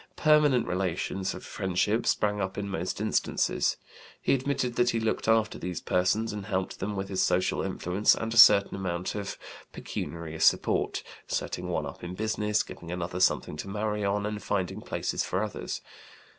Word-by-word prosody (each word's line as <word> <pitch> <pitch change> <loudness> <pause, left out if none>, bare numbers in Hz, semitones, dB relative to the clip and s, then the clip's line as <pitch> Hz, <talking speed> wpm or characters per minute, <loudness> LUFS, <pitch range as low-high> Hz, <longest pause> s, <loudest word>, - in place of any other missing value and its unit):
Permanent 150 -5 +4
relations 95 +1 -2
of - - -9
friendship 95 +4 0
sprang 105 -1 +1
up 95 0 -3
in 100 -1 -2
most 95 -1 -3
instances. 110 +1 +1 0.4
He - - +2
admitted 135 -2 -1
that 120 0 +3
he 115 - +1
looked 110 0 -1
after 110 -1 +2
these 90 -3 -4
persons 105 +5 +1
and 105 -2 -6
helped 95 -1 -2
them 100 +2 -3
with 95 0 -3
his 95 -1 -1
social 90 +1 +2
influence 95 +4 +2
and 115 0 -3
a - - -2
certain 100 -3 +8
amount 90 -2 -3
of 100 -1 -4 0.3
pecuniary 80 -1 -6
support - - +2 0.2
setting - - -3
one - - -1
up - - -9
in 90 +1 -5
business, 105 0 0
giving 85 -1 -9
another 90 0 -3
something 95 - +2
to 75 - -5
marry 105 +1 -2
on, 100 +1 0
and 105 0 -3
finding 95 -3 -2
places - - -2
for 95 +3 -1
others. 105 - -4
100 Hz, 170 wpm, -28 LUFS, 90-110 Hz, 0.4 s, certain